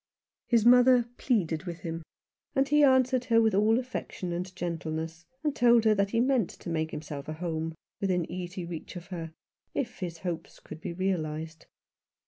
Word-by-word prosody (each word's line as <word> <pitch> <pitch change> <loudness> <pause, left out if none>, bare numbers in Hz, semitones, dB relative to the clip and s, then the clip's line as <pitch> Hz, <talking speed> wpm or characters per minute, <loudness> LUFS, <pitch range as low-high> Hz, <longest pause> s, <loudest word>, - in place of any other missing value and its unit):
His 230 -2 +3
mother 250 0 +7
pleaded 180 - 0
with 170 -2 -6
him, 165 -1 -4 0.5
and 270 0 +3
he 295 +1 +4
answered 260 -2 +4
her 230 -1 +4
with 220 -2 +3
all 215 +3 +4
affection 245 -8 -4
and 180 +2 -3
gentleness, 165 -1 -4 0.2
and 300 -2 0
told 235 -1 +5
her 215 - +6
that 200 -1 +1
he 230 - +1
meant 250 -5 +2
to 170 - -8
make 160 -1 0
himself 150 -2 -6
a 155 - -3
home 160 -1 -3 0.2
within 180 -3 +1
easy 180 +1 -5
reach 170 0 -7
of 175 +1 -8
her, 165 -3 -5 0.4
if 265 - -2
his 175 -4 -4
hopes 170 -2 -4
could 155 - -10
be - - -4
realized. 160 -3 -3
180 Hz, 175 wpm, -29 LUFS, 165-235 Hz, 0.5 s, mother